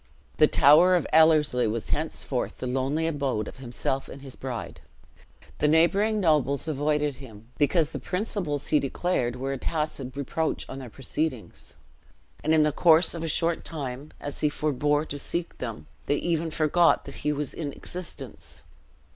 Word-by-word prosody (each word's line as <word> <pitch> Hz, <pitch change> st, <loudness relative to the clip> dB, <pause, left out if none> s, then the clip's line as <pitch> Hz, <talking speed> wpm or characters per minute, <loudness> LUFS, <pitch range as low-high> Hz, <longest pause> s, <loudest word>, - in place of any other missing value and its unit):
The -, -, +6 dB
tower 165 Hz, +6 st, +6 dB
of 175 Hz, -, +1 dB
Ellerslie 155 Hz, -6 st, +5 dB
was 110 Hz, +1 st, -3 dB
henceforth 145 Hz, -4 st, -2 dB
the -, -, -5 dB
lonely 135 Hz, +5 st, 0 dB
abode 140 Hz, -9 st, -1 dB
of -, -, -9 dB
himself 130 Hz, +1 st, -3 dB
and 140 Hz, -, -10 dB
his 135 Hz, -2 st, -8 dB
bride. 125 Hz, -4 st, -6 dB, 0.8 s
The 150 Hz, -, +3 dB
neighboring 195 Hz, +8 st, +3 dB
nobles 150 Hz, -5 st, +2 dB
avoided 150 Hz, -1 st, 0 dB
him, 115 Hz, -4 st, -13 dB
because 155 Hz, +1 st, +2 dB
the 140 Hz, -, -5 dB
principles 180 Hz, -, -3 dB
he 150 Hz, -, +4 dB
declared 135 Hz, -3 st, -1 dB
were 135 Hz, +2 st, -3 dB
a 135 Hz, -, -5 dB
tacit 150 Hz, -5 st, -3 dB
reproach 155 Hz, +3 st, -2 dB
on 135 Hz, -, -7 dB
their 130 Hz, -3 st, -8 dB
proceedings; 135 Hz, 0 st, -4 dB, 0.7 s
and -, -, +1 dB
in 160 Hz, -1 st, +5 dB
the 150 Hz, -, +2 dB
course 165 Hz, +3 st, +4 dB
of 165 Hz, -1 st, -5 dB
a -, -, -2 dB
short 165 Hz, +2 st, 0 dB
time, 140 Hz, -2 st, -6 dB
as 145 Hz, -, -6 dB
he 150 Hz, -, +2 dB
forbore 150 Hz, 0 st, 0 dB
to 145 Hz, -2 st, -6 dB
seek 170 Hz, +4 st, -2 dB
them, 115 Hz, -4 st, -5 dB, 0.2 s
they 145 Hz, -, +2 dB
even 165 Hz, +1 st, -1 dB
forgot 160 Hz, +2 st, +3 dB
that 140 Hz, -, -8 dB
he 150 Hz, -, -1 dB
was 145 Hz, -1 st, -3 dB
in 150 Hz, -4 st, -4 dB
existence. 180 Hz, +4 st, -7 dB
150 Hz, 165 wpm, -26 LUFS, 135-160 Hz, 0.8 s, The